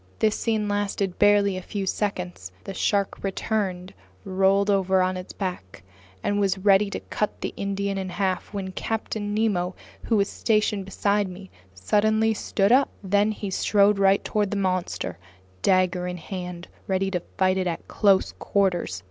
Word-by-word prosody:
This 215 -1 +2
scene 220 -2 0
lasted 200 -2 -1
barely 205 -2 +4
a - - -4
few 195 +1 -4
seconds. 95 - -3
The 195 - -6
shark 200 +1 0
returned, 190 -2 -2 0.3
rolled 195 +2 +3
over 190 -1 +2
on 185 0 0
its 185 0 -7
back, 180 - -6 0.4
and 205 0 0
was 195 -2 +2
getting 190 - -12
ready 200 0 +5
to - - -4
cut 210 - -3
the - - -3
Indian 200 0 -2
in 190 -1 -4
half, 190 -1 -2
when 195 -2 -4
Captain 215 +1 -3
Nemo, 195 -5 0 0.3
who 225 - +2
was 200 -1 +2
stationed 210 -3 0
beside 200 +1 0
me, 185 +1 -11 0.2
suddenly 215 - +2
stood 200 -1 0
up. 270 +2 +5
Then 205 +2 +2
he 205 -2 -5
strode 200 +1 +3
right 195 0 +4
toward 210 -2 0
the 205 - -2
monster, 185 - -2 0.4
dagger 185 -1 +2
in 180 0 -4
hand, 180 0 -6 0.2
ready 195 0 0
to 180 -2 -1 0.2
fight 190 -1 +3
it 185 - 0
at 170 - -4
close 200 -3 +3
quarters. 180 - 0
195 Hz, 165 wpm, -25 LUFS, 185-205 Hz, 0.4 s, ready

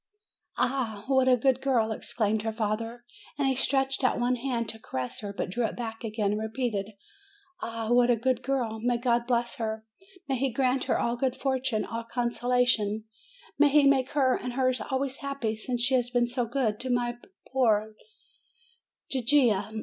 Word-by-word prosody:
"Ah, 245 -5 -1
what 265 -1 +3
a 255 -1 +6
good 260 +1 +2
girl!" 235 -5 +2
exclaimed 215 0 -1
her 225 +1 -2
father; 225 +2 -3 0.3
and 280 -2 +1
he 265 - +3
stretched 270 +1 +1
out 255 - +2
one 245 +1 +2
hand 235 -2 -2
to 220 - -6
caress 130 - -4
her, 205 -2 -5
but 195 -2 -4
drew 240 +5 -1
it 220 - -1
back 225 -1 -6
again, 215 -2 -1
and 210 +1 -1
repeated, 220 -3 -2 0.7
"Ah, 230 0 -3
what 245 0 +5
a 240 - +5
good 245 +2 0
girl! 245 -4 -1
May 240 +1 +1
God 235 0 +1
bless 240 -1 0
her, 220 -1 -3 0.4
may 270 -2 0
He 270 0 +1
grant 255 +2 +1
her - - +1
all 235 +1 0
good 255 0 0
fortune, 260 -5 -1
all 230 0 -4
consolations; 240 -3 +1 0.6
may 295 0 +6
He 295 +1 +5
make 270 -2 +4
her 265 -4 +3
and 250 - -4
hers 255 0 +1
always 270 0 -2
happy, 275 -6 -3
since 240 +2 -2
she 260 +2 +2
has 245 -2 +2
been 245 -1 +2
so 240 0 -1
good 230 -3 0
to 260 - -4
my 240 -1 0 0.4
poor 220 -4 +2 1.1
Gigia! 240 -6 +2
245 Hz, 180 wpm, -28 LUFS, 220-260 Hz, 1.1 s, a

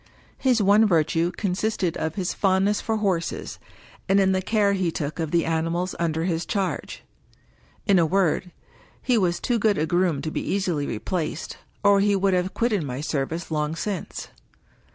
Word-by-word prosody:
His 250 -5 +2
one 205 +3 +5
virtue 165 -1 +2
consisted 195 -2 -1
of 160 0 -3
his 185 -3 -2
fond 190 -1 +2
ness 210 0 +1
for 220 -1 -1
horses, 190 -5 -2 0.5
and 195 +1 +5
in 190 -1 +3
the 185 0 +1
care 205 0 +2
he 185 -3 0
took 155 +1 -4
of 160 -2 -1
the 170 0 +1
animals 165 +3 -1
under 165 -1 0
his 170 -1 -1
charge. 195 -2 -3 0.8
In 200 -4 +4
a 165 - +4
word, 185 0 +1 0.5
he 250 - +1
was 180 -5 +1
too 240 -2 0
good 210 -1 +2
a 155 - +1
groom 175 -4 +1
to 155 - -3
be - - -2
easily 180 -7 -1
replaced, 160 - -3 0.3
or 200 -1 +5
he 200 0 +3
would 195 0 +2
have 180 +1 0
quitted 230 -5 +1
my 130 -3 -4
service 155 +3 -3
long 150 0 -1
since. 195 0 -4
180 Hz, 175 wpm, -24 LUFS, 165-200 Hz, 0.8 s, one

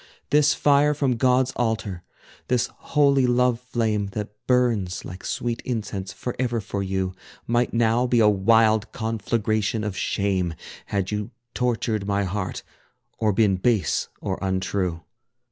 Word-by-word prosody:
This 145 -1 +4
fire 145 +1 +4
from 135 -4 +1
God's 125 +2 +3
altar, 110 -6 -1 0.5
this 125 -1 +1
holy 140 -3 +2
love 125 -1 +2
flame, 115 -5 -1
That 105 -1 -3 0.2
burns 115 -8 +1
like 90 +2 -8
sweet 120 -1 -2
incense 100 -6 -4
forever 120 +1 -2
for 100 -1 -4
you, 95 -1 -2 0.3
Might 120 +1 +1
now 115 +1 +2
be 120 -1 +3
a 110 - +6
wild 110 +1 +3
conflagration 110 -1 -1
of 105 -3 -3
shame, 95 -5 -1 0.3
Had 100 -1 -1
you 105 +1 -2 0.2
tortured 115 -4 -1
my 100 0 +1
heart, 95 0 -3 0.6
or 110 -1 +2
been 100 -2 +3
base 100 -5 +1
or 95 - -3
untrue. 95 -3 -1
110 Hz, 135 wpm, -24 LUFS, 100-125 Hz, 0.6 s, a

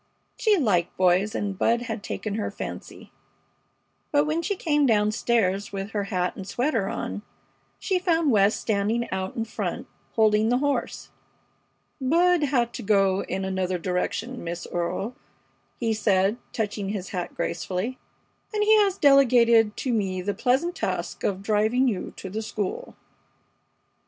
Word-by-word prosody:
She 430 -3 +3
liked 190 - +1
boys, 185 +3 +3
and 200 -1 -2
Bud 235 +5 +1
had 225 -3 -4
taken 215 0 -4
her 215 0 -2
fancy. - - -8 1.0
But 290 0 +3
when 310 +2 0
she 405 +4 -1
came 295 -5 +2
down 210 -2 +3
stairs 205 -4 0
with 195 +1 -5
her 205 -2 -2
hat 180 -3 -1
and 190 - -8
sweater 230 -2 0
on 95 +2 -4 0.6
she 370 - 0
found 330 -5 +2
West 205 -1 +3
standing 220 +3 0
out 190 0 -3
in 225 - -2
front, 220 - -4 0.3
holding 215 0 +3
the 245 - +3
horse. 285 +1 -2 0.9
"Bud 340 +6 +3
had 245 -4 0
to - - -6
go 195 -2 +2
in 190 - -3
another 185 -1 -1
direction, 185 +8 -3
Miss 170 +1 -5
Earle," 175 +7 -2 0.6
he 230 -2 +1
said, 205 0 +2
touching 205 -2 -3
his 200 -2 -4
hat 180 -3 -4
gracefully, 200 +8 -3 0.5
"and 420 -1 0
he 435 +1 +6
has 400 -2 +3
delegated 235 -6 +5
to 255 - -1
me 190 -4 -1
the 205 +2 -1
pleasant 275 - +1
task - - -3
of 195 -1 -1
driving 220 +5 +2
you 200 -7 -2
to - - -7
the 210 +4 -4
school." 215 -3 -4
215 Hz, 150 wpm, -25 LUFS, 195-255 Hz, 1.0 s, he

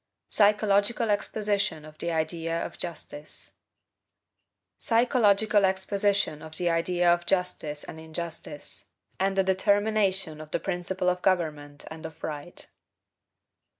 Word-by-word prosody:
PSYCHOLOGICAL 210 +1 +3
EXPOSITION 205 -6 0
OF 155 0 -14
THE 170 - -1
IDEA 165 +1 -1
OF - - -7
JUSTICE 155 -3 -7 1.3
PSYCHOLOGICAL 220 -3 +4
EXPOSITION 195 -3 +1
OF 160 0 -10
THE 175 -1 +1
IDEA 175 +1 +3
OF 175 0 -3
JUSTICE 180 -6 -1
AND 160 - -9
INJUSTICE, 160 -2 -6 0.3
AND 195 +1 +1
A 195 - +5
DETERMINATION 195 -3 +2
OF 155 - -10
THE - - -1
PRINCIPLE 180 0 -2
OF 180 0 +1
GOVERNMENT 150 -6 0
AND 160 0 -6
OF 160 - -16
RIGHT. 150 +2 -5
180 Hz, 115 wpm, -27 LUFS, 160-200 Hz, 1.3 s, A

